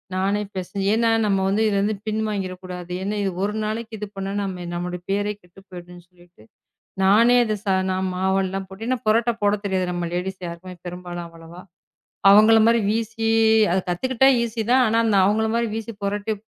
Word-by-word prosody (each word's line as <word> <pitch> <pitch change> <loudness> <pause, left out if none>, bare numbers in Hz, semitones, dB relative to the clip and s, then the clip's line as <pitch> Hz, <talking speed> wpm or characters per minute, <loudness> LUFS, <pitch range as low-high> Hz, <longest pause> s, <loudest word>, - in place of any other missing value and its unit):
நானே 195 +2 0 0.2
பெசஞ்சி, 195 +1 -4
ஏன்னா 230 0 +2 0.2
நம்ம 195 -2 +1
வந்து 205 +3 +1
இதிலிருந்து 205 +1 +1
பின் 215 0 -1
வாங்கிற 195 -3 -3
கூடாது. 180 -1 -8
ஏன்னா 200 +2 -2
இது 195 - 0
ஒரு 210 - -1
நாளைக்கு 220 +1 -4
இது 210 0 -5
பண்ணா 195 0 -4
நம்ம, 185 -3 -4
நம்மளோட 180 +1 -4
பேரே 205 +1 0
கெட்டு 180 +2 -19
போயிடும்னு 175 -1 -11
சொல்லிட்டு 175 -9 -22 0.6
நானே 225 +6 +5
அதைச் 215 -2 -4 0.3
நான் 185 0 -1
மாவு 190 +1 0
எல்லாம் 190 +1 -4
போட்டு, 195 +3 -9
ஏன்னா 255 -1 0
புரோட்டா 230 +2 +3
போடத் 205 0 +1
தெரியாது 190 -2 0
நம்ம 175 -1 -3
லேடீஸ் 185 +2 -3
யாருக்கும் 175 +1 -9
பெரும்பாலும் 175 -1 -6
அவ்வளவா? 165 +1 -13 0.7
அவங்களை 215 +2 +7
மாதிரி 230 0 +4
வீசி, 225 +1 -1 0.4
அதைக் 185 0 -1
கத்துக்கிட்டா 260 +8 +2
ஈசியா 230 -1 -3
தான். 260 0 +5
ஆனா 225 +1 +1
அந்த 210 - +2
அவங்களை 220 +2 +1
மாரி 235 -1 0
வீசி 225 0 -5
புரோட்டா 205 +2 -2
200 Hz, 180 wpm, -22 LUFS, 180-220 Hz, 0.7 s, அவங்களை